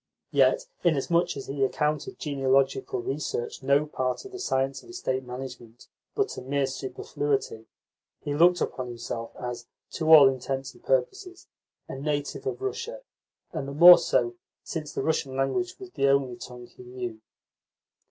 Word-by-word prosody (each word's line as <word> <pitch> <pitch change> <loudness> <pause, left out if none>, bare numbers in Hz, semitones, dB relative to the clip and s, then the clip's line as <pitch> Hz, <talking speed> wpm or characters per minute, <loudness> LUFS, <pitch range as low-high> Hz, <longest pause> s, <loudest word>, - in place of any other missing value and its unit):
Yet, - - +3 0.2
inasmuch 170 0 +2
as 135 - -6
he 135 0 -2
accounted 150 +2 -1
genealogical 135 -3 0
research 135 -3 -3
no 140 +2 +3
part 130 - -3
of 395 - -10
the 380 - -8
science 135 - -1
of - - -17
estate 130 - -2
management, 125 -2 -9 0.3
but 410 -2 0
a - - -5
mere 140 +2 0
superfluity, 130 -2 -3 0.6
he 145 - -2
looked 175 +4 +4
upon 130 -1 -2
himself 115 -1 -5
as, 120 -1 -6 0.2
to 160 -1 0
all 150 -4 +10
intents 135 0 -2
and - - -21
purposes, 395 -7 -1 0.4
a 135 - -7
native 145 - -3
of 405 -1 -4
Russia, 475 +5 -4 0.5
and 135 - -4
the 140 - -5
more 175 +4 +10
so 360 - +1 0.3
since 155 -3 -5
the - - -3
Russian 140 -4 -1
language 135 +7 -1
was 380 -2 -10
the 140 - +1
only 135 -2 +2
tongue 125 0 -10
he - - -17
knew. 125 -3 -7
135 Hz, 155 wpm, -27 LUFS, 130-160 Hz, 0.6 s, all